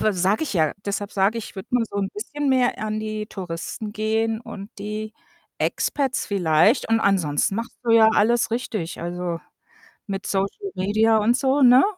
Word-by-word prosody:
we 215 - +2
sage 190 - +1
ich 310 - -2
ja 160 -5 +2
deshalb 200 0 -3
sage 200 +3 +2
ich, 225 - -7
ich - - -21
würde 190 - -7
mal 245 -2 +3
so - - -7
'n 195 -1 0
bisschen 295 -8 -4
mehr 255 -2 +2
an 215 0 -2
die 215 0 -4
Touristen 190 +2 -6
gehen 220 +1 0
und 205 -3 -9
die 215 +1 -5 0.5
Expats 275 -2 0
vielleicht 190 - +3
und 225 0 +3
ansonsten 185 -4 +1
machst 230 +2 -5
du 235 - +1
ja 225 -1 +7
alles 230 +2 +3
richtig, 220 -7 -3
also, 175 0 -3 0.7
mit 195 -3 -4
Social 200 - -2
Media 215 +4 +3
und 220 +3 +3
so, 270 +2 +1
ne? 250 +1 +7
215 Hz, 180 wpm, -23 LUFS, 195-230 Hz, 0.7 s, ja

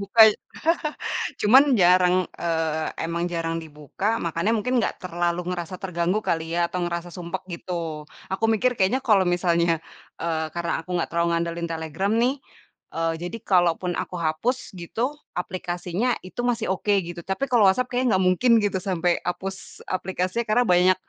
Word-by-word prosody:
buka. 200 +3 +1 1.2
Cuman 255 +7 +8 0.2
jarang, 180 0 +5 0.3
eee, 160 -2 0 0.2
emang 170 +1 -2
jarang 165 -1 -1
dibuka 150 +5 -6 0.2
makannya 170 +6 0
mungkin 250 +4 -1
enggak - - 0
terlalu 175 -1 -1
ngerasa 175 0 -4
terganggu 180 +1 0
kali 165 0 -1
ya - - 0
atau 180 - -3
ngerasa 170 0 -4
sumpek 180 +1 -5
gitu. 170 +2 -6 0.6
Aku 190 - -1
mikir 250 +4 +2
kayaknya 195 +8 +2
kalau 200 -5 +4
misalnya, 170 -1 +2 0.5
eee, 160 -1 -1
karena 170 0 -2
aku - - -31
enggak 170 - -1
terlalu 170 0 +1
ngandelin 170 0 -1
Telegram 160 +5 -2
nih. 255 +3 +3 0.6
Eee, 165 0 0
jadi 175 +6 -4
kalaupun 175 -2 +2
aku - - -4
hapus 170 +10 -1
gitu, 235 - -2 0.2
aplikasinya 180 +5 -2
itu 185 +6 -7
masih 225 -4 -2
oke 205 +2 0
gitu, 175 0 -8
tapi 190 +8 -1
kalau 235 -5 +5
WhatsApp 250 +6 +1
kayaknya 250 +1 0
enggak 190 0 +2
mungkin 235 +7 +3
gitu 200 -2 0
sampai 180 -2 0
hapus 190 +2 -5
aplikasinya 185 +4 -1
karena 245 +3 +3
banyak 185 +1 +4
180 Hz, 155 wpm, -24 LUFS, 170-200 Hz, 1.2 s, Cuman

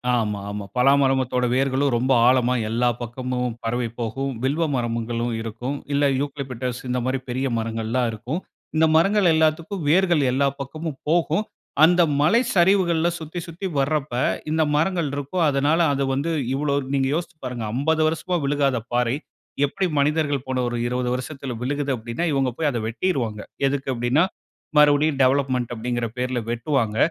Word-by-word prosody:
ஆமா, 105 -4 -1
ஆமா. 105 0 -5
பலா 125 +2 +5
மரத்தோட 130 -2 +1
வேர்களும் 135 +1 +1
ரொம்ப 130 +3 +1 0.2
ஆழமா 125 -1 +3 0.2
எல்லா 120 +2 +2
பக்கமும் 125 0 -3
பரவி 120 +1 -1
போகும். 135 +4 -2
வில்வ 145 +5 +1
மரங்களும் 115 0 -2
இருக்கும். 120 +5 -4 0.2
இல்ல 145 +1 +2 0.2
யூக்களிப்பிடஸ் 130 -3 -4
இந்தமாரி 125 +1 -1
பெரிய 130 +2 -1
மரங்கள்லாம் 115 +2 -1
இருக்கும். 120 +9 -4 0.4
இந்த 160 +1 +5
மரங்கள் 195 +3 +4
எல்லாத்துக்கும் 160 +3 0
வேர்கள் 175 -1 +4
எல்லா 140 +2 +2
பக்கமும் 155 +1 -5
போகும். 165 +3 +2 0.4
அந்த 175 +2 +6 0.2
மலை 215 +11 +4
சரிவுகள்ல 175 -2 +3
சுத்தி, 160 +2 -6
சுத்தி 170 +4 -7
வர்றப்ப 145 -1 0
போது 125 - 0
இந்த 160 0 +2
மரங்கள் 165 0 +1
இருக்கும். 145 +5 -1
அதனால 145 +4 +2
அது 140 0 0
வந்து 145 +5 -1 0.2
இவ்ளோ 145 0 0 0.2
நீங்க 135 -1 +2
யோசித்து 170 0 -4
பாருங்க. 125 -3 -4
50 160 +4 +1
வருஷமா 165 +3 -1
விழுகாத 140 -2 +1 0.2
பாறை 120 0 +2 0.5
எப்பிடி 185 +7 -1
மனிதர்கள் 145 -2 +1
போன 130 -1 -1
ஒரு 120 0 -2
20 125 0 -1
வருஷத்தில 130 +1 -5
விழுகுது, 140 +2 -1
அப்பிடின்னா 120 +7 -3
இவுங்க 135 -2 +1
போய் 155 -2 +1
அத 120 - -2
வெட்டிருவாங்க. 115 - -1 0.3
எதுக்கு 135 0 -2
அப்பிடின்னா 120 +6 +2 0.5
மறுபடியும் 145 0 +4
டெவலப்மென்ட் 130 -2 +2
அப்பிடீங்கிற 120 +1 -2
பேர்ல 125 0 -1
வெட்டுவாங்க. 120 -2 0
135 Hz, 150 wpm, -23 LUFS, 125-155 Hz, 0.5 s, அந்த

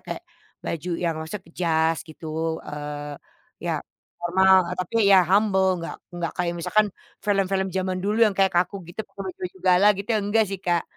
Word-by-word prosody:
kayak - - -5 0.4
baju 165 +2 -3
yang 165 -2 +1
maksudnya 160 +5 -6
ke 165 - -18
jas 160 -1 +2
gitu, 160 +1 -10 0.4
eee, 145 0 -6 0.5
iya - - -1 0.5
normal, 190 +2 +5 0.2
tapi 185 +4 -4
iya 195 -1 +8
humble 195 -1 +4
enggak 165 - -5 0.2
enggak 170 -2 -2
kayak 175 -1 0
misalkan 210 +5 +2 0.4
film-film 195 -1 +1
zaman 185 0 -1
dulu 210 +2 0
yang 205 - 0
kayak 195 -1 +4
kaku 180 +3 +2
gitu, 175 +5 -6
pake 195 -1 -6
baju 180 +1 -5
gala 185 +2 +5
gitu 200 +3 -6
iya 220 - +3
enggak 215 +2 +3
sih, 195 - -3
Kak. 175 -2 +2
185 Hz, 175 wpm, -24 LUFS, 170-195 Hz, 0.5 s, iya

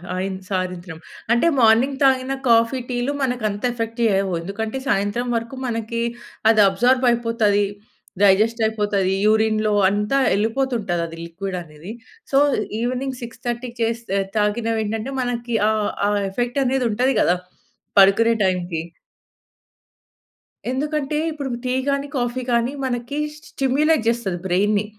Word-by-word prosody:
ఆయిన్ 190 +1 -2
సాయంత్రం. 180 -3 -3 0.3
అంటే, 240 +7 +3
మార్నింగ్ 235 +5 +4
తాగిన 265 0 +3 0.2
కాఫీ, 230 +3 +4
టీ‌లు 245 +2 -1
మనకంత 215 -5 -2
ఎఫెక్ట్ 230 -1 -4
చేయవు. 195 -3 +2
ఎందుకంటే, 220 +7 -4
సాయంత్రం 205 +5 0
వరకు 230 +3 -3
మనకి, 230 0 -3 0.5
అది 220 -1 +5
అబ్జార్బయిపోతది, 230 -2 +2 0.6
డైజెస్టయిపోతది, 210 -1 +2
యూరిన్‌లో 215 0 +2 0.2
అంతా 210 +6 0 0.2
ఎళ్ళిపోతుంటదది 210 -8 -1
లిక్విడనేది. 175 0 -7 0.4
సో, 270 - +3 0.4
ఈవెనింగ్ 255 +1 -2
6:30కి 240 +1 -5
చేస్తే 230 -3 -2
ఆహ్, 195 - -5
తాగినవేంటంటే 220 +3 -1
మనకి 240 -1 -2
ఆ - - +3 0.4
ఆ - - +1 0.2
ఎఫెక్టనేది 250 +3 0
ఉంటది 255 +4 +1
గదా! 180 - +3 0.6
పడుకునే 200 +4 +6
టైంకి. 175 -3 -1 1.9
ఎందుకంటే 300 +2 -2
ఇప్పుడు 285 -3 -5 0.2
టీ 250 - 0 0.2
గాని, 280 0 -1
కాఫీ 245 +1 -1
గాని 235 +3 +1
మనకి 245 +2 -3 0.3
స్టిమ్యులేట్ 275 +1 +1
చేస్తది 210 -7 -1
బ్రైన్‌ని. 205 +3 +1
230 Hz, 110 wpm, -21 LUFS, 200-250 Hz, 1.9 s, పడుకునే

